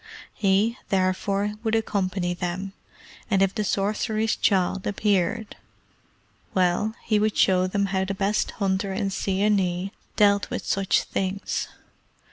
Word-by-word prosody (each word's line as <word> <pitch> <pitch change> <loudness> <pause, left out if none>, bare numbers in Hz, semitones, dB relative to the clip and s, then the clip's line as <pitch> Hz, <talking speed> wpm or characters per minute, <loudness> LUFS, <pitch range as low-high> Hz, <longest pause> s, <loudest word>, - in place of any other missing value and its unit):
He, 205 +4 +2
therefore, 195 +2 0
would 225 -1 0
accompany 190 -5 0
them, 180 +2 -4 0.6
and 195 -3 +3
if 195 0 +1
the 215 - -1
sorcerer's 215 +2 0
child 190 -1 +1
appeared 205 +1 0 1.0
well, 185 +4 +2
he 215 -2 +2
would 215 0 0
show 185 -1 +4
them 200 +2 0
how 190 0 +2
the 195 +1 -3
best 200 +2 0
hunter 195 -1 0
in 195 0 -1
Seeonee 195 -1 0 0.2
dealt 200 -1 +3
with - - -4
such 195 -1 +1
things. 195 +1 -2
195 Hz, 125 wpm, -25 LUFS, 190-210 Hz, 1.0 s, show